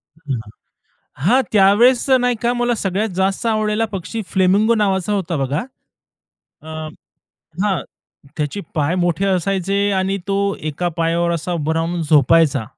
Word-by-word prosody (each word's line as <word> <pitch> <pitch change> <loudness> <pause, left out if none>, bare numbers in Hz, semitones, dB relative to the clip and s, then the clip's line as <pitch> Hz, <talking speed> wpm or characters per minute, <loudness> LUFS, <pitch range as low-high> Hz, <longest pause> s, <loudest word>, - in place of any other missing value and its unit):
हां, 145 -7 -4 0.9
हां. 255 +8 +4
त्यावेळेस 220 +7 +4
नाही 245 -1 +1
का, 240 +1 +2
मला 240 0 0
सगळ्यात 205 +1 -1
जास्त 190 +4 0
आवडलेला 215 0 +1
पक्षी 195 +5 -4
फ्लेमिंगो 200 +4 +3
नावाचा 200 -2 0
होता 180 -5 -1
बघा. 140 +3 -1 1.0
अ 160 - -14 1.0
हां. 190 -8 0 0.5
त्याचे 150 +6 -3
पाय 155 +2 0
मोठे 175 +3 0
असायचे, 195 +2 0
आणि 190 +1 0
तो 195 - +1 0.3
एका 175 +5 -2
पायावर 170 +1 +1
असा 170 +2 -3
उभा 160 -1 -1
राहून 165 +2 -1
झोपायचा. 150 -3 +3
190 Hz, 130 wpm, -19 LUFS, 165-210 Hz, 1.0 s, हां